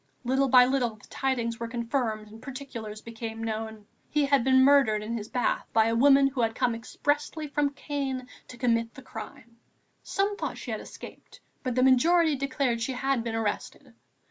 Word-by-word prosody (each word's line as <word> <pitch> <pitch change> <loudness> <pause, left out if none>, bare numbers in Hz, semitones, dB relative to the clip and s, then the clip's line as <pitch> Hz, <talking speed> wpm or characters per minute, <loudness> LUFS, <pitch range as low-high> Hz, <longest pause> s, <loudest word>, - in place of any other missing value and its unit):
Little 265 +2 +2
by 250 0 +8
little 250 -3 0
the 215 - -18
tidings 235 -4 -1
were 230 - -3
confirmed 230 -2 -2
and 220 +1 -13
particulars 240 -6 -7
became 225 -1 -6
known; 220 -1 -4 0.2
he 300 -1 +2
had 275 -3 +3
been 260 0 +5
murdered 265 -7 +4
in 230 +2 -3
his 215 -2 -5
bath 245 - 0
by 220 -1 +5
a 230 0 +1
woman 275 +3 +6
who 275 -2 0
had 225 -1 0
come 240 - +1
expressly 295 +6 -2
from 290 0 +1
Caen 270 -3 -3 0.2
to 250 - -11
commit 230 -2 0
the 265 - -11
crime. 230 0 -10 0.4
Some 405 0 -1
thought - - -4
she - - -6
had - - -3
escaped; - - -12 0.2
but 255 -2 -2
the 255 - +3
majority 315 +5 +4
declared 260 -3 -1
she 260 +4 -1
had 265 -1 0
been 230 -1 -3
arrested. 220 -2 -3
250 Hz, 185 wpm, -27 LUFS, 225-275 Hz, 0.4 s, by